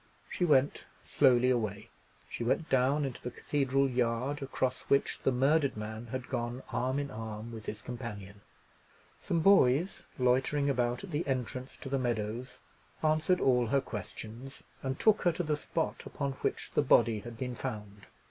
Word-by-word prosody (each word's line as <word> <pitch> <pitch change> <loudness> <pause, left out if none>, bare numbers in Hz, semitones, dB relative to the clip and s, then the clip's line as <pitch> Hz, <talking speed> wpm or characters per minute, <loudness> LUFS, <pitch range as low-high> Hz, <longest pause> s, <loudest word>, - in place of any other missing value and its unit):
She 180 - 0
went 145 -3 +2 0.2
slowly 125 -2 +4
away. 110 -2 -2 0.4
She - - -5
went 150 +7 0
down 135 +3 +3
into 130 - -5
the 125 - -4
cathedral 135 +1 +1
yard, 125 +3 0
across 130 -1 -1
which 140 - +2
the - - +2
murdered 140 +1 +2
man 110 +2 -6
had 130 +2 -5
gone 120 +2 -3
arm 130 +2 0
in 140 -1 -2
arm 110 0 -6
with 110 -2 -9
his 110 - -5
companion. 105 -5 -7 0.8
Some 170 -2 0
boys, 170 -2 +4
loitering 135 +3 +2
about 120 +1 0
at 195 - -8
the 150 +1 -2
entrance 130 0 -3
to - - -8
the 135 0 0
meadows, 120 +1 -2 0.5
answered 155 +4 +3
all 125 -2 +3
her 140 +5 +3
questions, 115 +3 -7 0.2
and 130 0 -3
took 215 -1 +4
her 175 - +3
to 175 - -2
the 155 -2 0
spot 160 +2 -2
upon 140 -2 -3
which 135 - -3
the - - +3
body 115 -2 +4
had 115 +2 -9
been 125 +1 -3
found. 105 -5 -6
130 Hz, 165 wpm, -31 LUFS, 115-140 Hz, 0.8 s, slowly